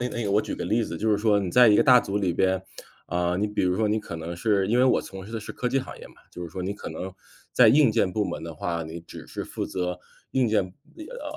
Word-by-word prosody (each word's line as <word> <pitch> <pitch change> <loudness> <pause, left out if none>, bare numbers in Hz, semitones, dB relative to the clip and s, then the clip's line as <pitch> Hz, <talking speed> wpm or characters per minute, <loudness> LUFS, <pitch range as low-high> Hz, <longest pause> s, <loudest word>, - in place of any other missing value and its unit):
那 125 - -1
个 - - -7
那 120 - -2
个 100 - -1
我 105 +2 +3
举 - - -5
个 - - -4
例 115 +2 +1
子， 85 -6 -5
就 110 - -1
是 105 - +4
说 105 -1 +3
你 100 -2 -2
在 125 -1 +7
一 105 - +6
个 - - +4
大 125 -3 +7
组 100 -2 -2
里 95 -4 0
边， 95 +1 +1 0.5
啊， 90 0 0
你 100 +3 0
比 105 0 -2
如 90 0 +1
说 110 +1 +1
你 105 +1 0
可 85 - -7
能 80 +2 -6
是 100 0 +1
因 110 +5 +1
为 125 - +4
我 130 - +3
从 95 -1 -9
事 105 - -11
的 115 - -3
是 110 - -8
科 125 - -2
技 135 - +1
行 130 - -7
业 - - -10
嘛， - - -19 0.2
就 90 - -7
是 85 - -6
说 90 +4 -7
你 95 +2 -2
可 - - -8
能 90 +4 -6 0.4
在 - - +6
硬 140 -4 +5
件 90 - +1
部 105 +2 0
门 - - -5
的 85 0 -6
话， 85 +2 -3
你 80 +1 -7
只 85 -2 -11
是 - - -6
负 - - -5
责 90 -1 -3 0.3
硬 130 -2 +2
件 110 -1 +2 0.4
呃， - - -8
100 Hz, 325 characters per minute, -25 LUFS, 90-115 Hz, 0.5 s, 在